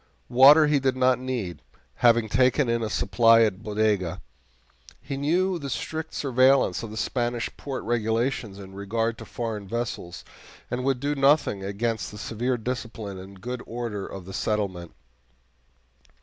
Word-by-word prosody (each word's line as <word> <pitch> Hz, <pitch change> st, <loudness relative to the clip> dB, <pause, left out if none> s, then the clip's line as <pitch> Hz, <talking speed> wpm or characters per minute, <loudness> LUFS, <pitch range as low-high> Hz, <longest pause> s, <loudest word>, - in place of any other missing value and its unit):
Water 140 Hz, +5 st, +8 dB
he 150 Hz, -1 st, +3 dB
did 130 Hz, -1 st, +1 dB
not 130 Hz, -1 st, +3 dB
need, 120 Hz, -, -4 dB, 0.4 s
having 120 Hz, -2 st, +4 dB
taken 130 Hz, +4 st, +3 dB
in 115 Hz, 0 st, 0 dB
a 110 Hz, -, -2 dB
supply 115 Hz, +2 st, +4 dB
at 105 Hz, -3 st, 0 dB
Bodega. 105 Hz, -5 st, 0 dB, 0.8 s
He 140 Hz, +1 st, -6 dB
knew 175 Hz, +6 st, +1 dB
the 140 Hz, -2 st, -5 dB
strict 160 Hz, +3 st, -4 dB
surveillance 130 Hz, -6 st, +3 dB
of 115 Hz, -, -6 dB
the 110 Hz, -, -8 dB
Spanish 120 Hz, 0 st, -2 dB
port 135 Hz, -3 st, -5 dB
regulations 115 Hz, -1 st, -1 dB
in 95 Hz, -1 st, -11 dB
regard 115 Hz, +4 st, -2 dB
to -, -, -8 dB
foreign 110 Hz, -4 st, -5 dB
vessels, 110 Hz, -6 st, -5 dB, 0.5 s
and 125 Hz, +1 st, -2 dB
would 135 Hz, -1 st, +1 dB
do 145 Hz, +3 st, -1 dB
nothing 140 Hz, -8 st, +2 dB
against 110 Hz, +3 st, -2 dB
the 105 Hz, -, -10 dB
severe 120 Hz, +4 st, -2 dB
discipline 115 Hz, -4 st, -5 dB
and 95 Hz, 0 st, -12 dB
good 125 Hz, +1 st, -5 dB
order 115 Hz, -4 st, -4 dB
of 95 Hz, -2 st, -9 dB
the 95 Hz, -, -9 dB
settlement. 95 Hz, -, -2 dB
115 Hz, 150 wpm, -25 LUFS, 105-130 Hz, 0.8 s, Water